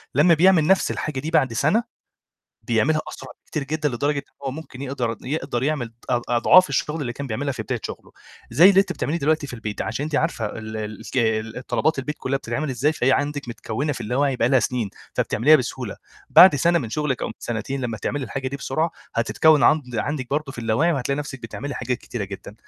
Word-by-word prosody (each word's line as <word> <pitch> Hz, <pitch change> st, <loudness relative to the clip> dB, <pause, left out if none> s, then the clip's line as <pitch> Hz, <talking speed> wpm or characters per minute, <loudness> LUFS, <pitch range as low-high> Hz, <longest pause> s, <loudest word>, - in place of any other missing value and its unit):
لمّا 170 Hz, +4 st, +6 dB
بيعمل 165 Hz, -1 st, +5 dB
نَفْس 190 Hz, -, +3 dB
الحاجة 150 Hz, -3 st, -3 dB
دي 155 Hz, +5 st, -4 dB
بعد 130 Hz, -7 st, +2 dB
سَنة، 180 Hz, -, +2 dB, 0.8 s
بيعملها 135 Hz, +6 st, +1 dB
أسرع -, -, -9 dB, 0.2 s
بكتير 150 Hz, -, -3 dB
جدًا، 155 Hz, +1 st, -1 dB
لدرجة 140 Hz, +3 st, -1 dB
إن -, -, -4 dB, 0.2 s
هو 135 Hz, -, -1 dB
ممكن 140 Hz, -2 st, -9 dB
يقدر 125 Hz, -4 st, -2 dB
يقدر 130 Hz, -3 st, -2 dB
يعمل 135 Hz, -6 st, -1 dB, 0.2 s
اض 120 Hz, -1 st, +1 dB
أضعاف 140 Hz, +9 st, +6 dB
الشغل 150 Hz, +3 st, -1 dB
اللي 125 Hz, -4 st, -3 dB
كان 140 Hz, +2 st, -6 dB
بيعملها 135 Hz, +5 st, -2 dB
في 115 Hz, -3 st, -5 dB
بداية 120 Hz, 0 st, -3 dB
شغله، -, -, -8 dB, 0.4 s
زي 180 Hz, +5 st, +7 dB
اللي 195 Hz, -, +6 dB
أنتِ 200 Hz, -, -1 dB
بتعمليه 165 Hz, +4 st, -2 dB
دلوقتي 155 Hz, 0 st, +1 dB
في 125 Hz, -, -7 dB
البيت، 110 Hz, -3 st, -4 dB
عشان 115 Hz, +6 st, -3 dB
أنتِ 155 Hz, -, -5 dB
عارفة 150 Hz, -9 st, 0 dB
ال 110 Hz, +1 st, -6 dB
ال 105 Hz, -1 st, -6 dB
ك 110 Hz, 0 st, 0 dB
طلبات 155 Hz, -3 st, +1 dB
البيت 150 Hz, +3 st, -3 dB
كُلّها 135 Hz, +1 st, -1 dB
بتتعمل 150 Hz, +1 st, -3 dB
ازاي، 135 Hz, +5 st, +1 dB
فهي 135 Hz, -3 st, +2 dB
عندِك 145 Hz, -2 st, -1 dB
متكونة 125 Hz, +5 st, -3 dB
في -, -, -7 dB
اللا 120 Hz, +4 st, -2 dB
وعي 140 Hz, -1 st, +1 dB
بقى 120 Hz, 0 st, +2 dB
لها 130 Hz, -1 st, +4 dB
سنين، 115 Hz, -4 st, -1 dB, 0.2 s
فبتعمليها 150 Hz, +8 st, +4 dB
بسهولة، 125 Hz, -4 st, -4 dB, 0.3 s
بعد 180 Hz, -5 st, +9 dB
سَنة 170 Hz, +4 st, +3 dB
من 115 Hz, -8 st, -5 dB
شغلِك 150 Hz, -3 st, -1 dB
أو -, -, 0 dB
من -, -, -6 dB
سنتين، 120 Hz, +4 st, -4 dB
لمّا 115 Hz, -3 st, -3 dB
تعملي 145 Hz, +7 st, -2 dB
الحاجة 130 Hz, +3 st, -4 dB
دي 140 Hz, -, -5 dB
بسرعة، 155 Hz, +5 st, -1 dB, 0.2 s
هتتكون 150 Hz, +6 st, +3 dB
عند 125 Hz, -6 st, +3 dB
عندِك 135 Hz, 0 st, -3 dB
برضه 145 Hz, -1 st, -2 dB
في 120 Hz, -, -13 dB
اللا 110 Hz, -1 st, 0 dB
وعي، 165 Hz, +8 st, +3 dB
وهتلاقي 140 Hz, 0 st, -1 dB
نفْسِك 135 Hz, -3 st, -6 dB
بتعملي 140 Hz, +5 st, -6 dB
حاجات 125 Hz, 0 st, -2 dB
كتيرة 115 Hz, -6 st, -5 dB
جدًا، 100 Hz, +1 st, -9 dB
135 Hz, 215 wpm, -23 LUFS, 120-150 Hz, 0.8 s, بعد